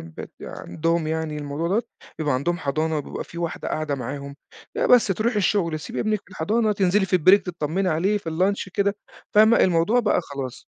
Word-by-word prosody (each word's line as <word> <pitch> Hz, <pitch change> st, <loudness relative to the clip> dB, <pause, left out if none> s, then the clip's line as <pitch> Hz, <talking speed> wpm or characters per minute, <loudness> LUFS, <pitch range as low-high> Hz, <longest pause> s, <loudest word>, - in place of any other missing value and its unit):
بيبقى 80 Hz, -1 st, -9 dB
عندهم 165 Hz, 0 st, -2 dB
يعني 160 Hz, -1 st, -2 dB
الموضوع 145 Hz, +3 st, -3 dB
دوّة، 210 Hz, +6 st, +1 dB, 0.4 s
بيبقى 150 Hz, -4 st, 0 dB
عندهم 170 Hz, +7 st, -1 dB
حضانة 155 Hz, +2 st, -1 dB
وبيبقى 145 Hz, -, -6 dB
في 170 Hz, -, -10 dB
واحدة 170 Hz, -1 st, -3 dB
قاعدة 155 Hz, -2 st, -2 dB
معاهم. 140 Hz, +1 st, -6 dB, 0.4 s
آآ -, -, +1 dB
بس 245 Hz, -3 st, +6 dB
تروحي 215 Hz, +4 st, 0 dB
الشُغل 195 Hz, -4 st, +1 dB
تسيبي -, -, -5 dB
ابنِك 215 Hz, -1 st, 0 dB
في -, -, -23 dB
الحضانة، 210 Hz, +5 st, +1 dB
تنزلي 195 Hz, 0 st, +2 dB
في -, -, -14 dB
البريك 185 Hz, +3 st, +5 dB
تطّمّني 175 Hz, +2 st, -1 dB
عليه 185 Hz, +6 st, +1 dB
في 165 Hz, -, -6 dB
الlunch 190 Hz, +4 st, 0 dB
كده، 200 Hz, 0 st, +1 dB, 0.4 s
فاهمة؟ 220 Hz, +2 st, +6 dB
الموضوع 185 Hz, +7 st, +3 dB
بقى 210 Hz, -5 st, +2 dB
خلاص. 135 Hz, -4 st, -7 dB
170 Hz, 185 wpm, -23 LUFS, 155-200 Hz, 0.4 s, بس